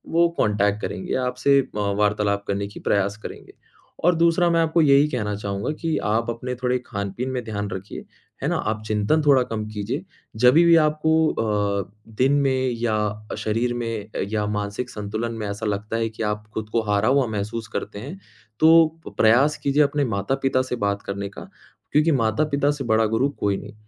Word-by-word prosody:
वो 170 0 +5
कॉन्टैक्ट 105 0 +1
करेंगे। 185 - -3
आपसे 135 +2 +3
अ, 125 -5 -7
वार्तालाप 100 0 0
करने 100 0 -1
की 100 - -11
प्रयास 100 +1 +1
करेंगे, - - -9 0.5
और 175 - +5
दूसरा 170 +1 +3
मैं 165 0 +2
आपको 165 +1 +2
यही 140 0 +5
कहना 105 -6 -2
चाहूँगा 100 +3 -3
कि 165 -1 0
आप 115 +2 0
अपने 120 +2 -4
थोड़े 125 0 0
खान-पीन 100 +4 -4
में 125 -2 -3
ध्यान 105 -2 -4
रखिए, 95 +2 -7 0.4
है - - +1
ना? - - 0
आप 110 0 -2
चिंतन 110 +9 +1
थोड़ा 135 -3 +6
कम 110 -3 -4
कीजिए, 105 -1 -4 0.3
जभी-भी 155 +9 +6
आपको 155 +1 +1 0.7
अ, - - -26 0.3
दिन 135 +2 +4
में 130 -2 +1
या 105 -2 -1
शरीर 115 +3 -1
में 115 -3 -4 0.2
या 105 -1 0
मानसिक 105 +4 -3
संतुलन 110 +1 -4
में 105 - -3
ऐसा 100 +2 -4
लगता 105 +2 -2
है 115 0 0
कि 110 0 -6
आप 105 0 -2
ख़ुद 110 -1 -4
को 115 - +3
हारा 100 +2 +2
हुआ 140 -1 +3
महसूस 110 +1 -4
करते 100 0 -4
हैं। 150 - -8 0.4
तो 165 +1 +7 0.3
प्रयास 125 +7 +4
कीजिये 145 +1 +3
अपने 145 0 0
माता-पिता 135 +6 0
से 130 -1 -3
बात 100 0 -1
करने 100 0 -4
का, 100 - -10 0.4
क्योंकि 155 +2 +3
माता-पिता 140 +5 +1
से 145 -2 -4
बड़ा 110 0 +3
गुरु, 115 +6 +1
कोई 100 -8 -1
नहीं। - - -10
115 Hz, 180 wpm, -23 LUFS, 105-140 Hz, 0.7 s, तो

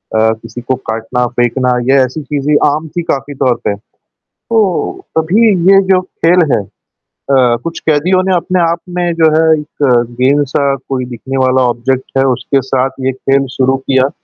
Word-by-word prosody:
अ, 110 0 +3
किसी 115 +2 -9
को 125 +2 -1
काटना, 115 +3 -1
फेंकना 125 +1 +1 0.2
ये 140 - +5
ऐसी 130 +5 -6
चीज़ें 145 +1 -1
आम 150 +2 -1
थी - - +1
काफ़ी 140 -2 -3
तौर 130 -2 +1
पे। 100 - -1 0.5
तो 230 - -3 0.6
तभी 195 +9 +3 0.2
ये 195 0 +7
जो 185 - +4
खेल 175 -2 +1
है - - -2 0.7
अ, 125 -3 +3
कुछ 165 0 -5
कैदियों 165 +5 +2
ने 190 0 0
अपने 180 +1 0
आप 170 0 +1 0.2
में 175 -1 0
जो 165 -1 +3
है 160 - +4 0.2
एक 150 0 -7 0.4
गेंद-सा 140 +1 +1 0.3
कोई 130 -2 -2
दिखने 125 +2 -6
वाला 130 0 +2
ऑब्जेक्ट 130 +3 -2
है 135 - +3
उसके 135 +2 0
साथ 130 0 0 0.2
ये - - +2
खेल 135 +1 0
शुरू 130 0 +2
किया 130 0 +1
135 Hz, 175 wpm, -13 LUFS, 130-160 Hz, 0.7 s, ये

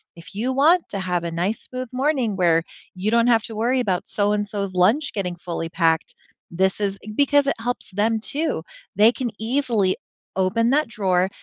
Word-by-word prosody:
"If 170 +3 -13
you 235 +5 -1
want 320 +6 +4
to 200 - -4
have 180 -2 -1
a 170 - -3
nice 180 +6 -2
smooth 255 -1 -6
morning, 260 -5 0
where 165 -2 +3 0.3
you 195 +4 -1
don't 235 +1 +4
have 230 -2 +4
to 225 - -7
worry 240 +4 +1
about 185 -5 -1
so-and-so's 205 -1 -1
lunch 220 +12 +3
getting 180 -4 -2
fully 170 -1 -4
packed, 165 -1 +1 0.4
this 190 +3 +1
is" 195 -1 -1 0.2
Because 285 0 +3
it 275 - +2
helps 245 -3 -4
them, 220 +3 +1
too. 285 - -2 0.3
They 215 +3 +7
can 245 -3 -3
easily 225 -5 +1 0.4
open 195 +5 +2
that 300 -1 +2
drawer, 190 -4 +1
210 Hz, 180 wpm, -22 LUFS, 185-245 Hz, 0.4 s, They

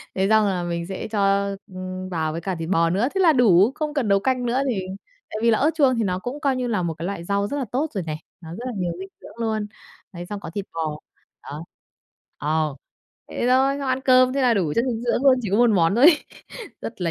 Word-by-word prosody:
Thế 190 +1 +1
xong 215 -1 +4
là 180 -3 -1
mình 170 0 -3
sẽ 190 +2 -5
cho, 200 -1 +2 0.2
ưm, 185 -1 -6
vào 160 -3 -1
với 165 +2 -5
cả 190 +1 -3
thịt 165 +1 -5
bò 165 -3 +3
nữa, 200 +8 +1
thế - - +1
là 325 -4 +6
đủ, 215 -3 +5
không 300 -1 -3
cần 270 -7 -1
nấu 200 0 +4
canh 255 +2 0
nữa 250 +3 +1
thì 200 -6 -1 0.5
tại 215 - -5
vì 230 0 +4
là 220 - +3
ớt 305 +3 +3
chuông 270 -5 +3
thì 225 - +1
nó 185 -1 -1
cũng, 245 +8 -5
coi 275 -3 +1
như 250 -1 -2
là, 210 -6 0
một 165 -1 -1
cái 165 +2 -7
loại 190 -3 -4
rau 200 +2 0
rất 285 - -3
là 265 - -2
tốt 280 +6 0
rồi 190 -4 -2
này, 155 0 -5 0.2
nó 160 -1 -10
rất 230 +8 -7
là 250 - -4
nhiều 175 -2 -1
dinh 190 - -6
dưỡng - - -12
luôn. 220 -2 -1 0.5
Đấy, 175 0 -7
xong 205 +1 -6
có 165 - -8
thịt 200 -1 -3
bò. 155 -2 -3 0.4
Đó. 150 +3 -7 0.7
Ờ. 155 -1 -1 0.5
Thế 240 - -2
thôi, 270 +2 +3
xong 275 -2 -3
ăn 260 +1 0
cơm 255 0 +5
thế 275 -1 0
là 245 -2 +4
đủ 170 -7 0
chất 235 - +2
dinh 230 -1 -3
dưỡng 245 +2 0
luôn, 260 -2 +6
chỉ 210 - -3
có 200 - +2
một 240 -1 +5
món 175 -2 +3
thôi 245 +5 +4
ấy. 320 -2 +6 0.6
Rất 225 -4 -7
là 165 - 0
205 Hz, 265 wpm, -23 LUFS, 175-250 Hz, 0.7 s, là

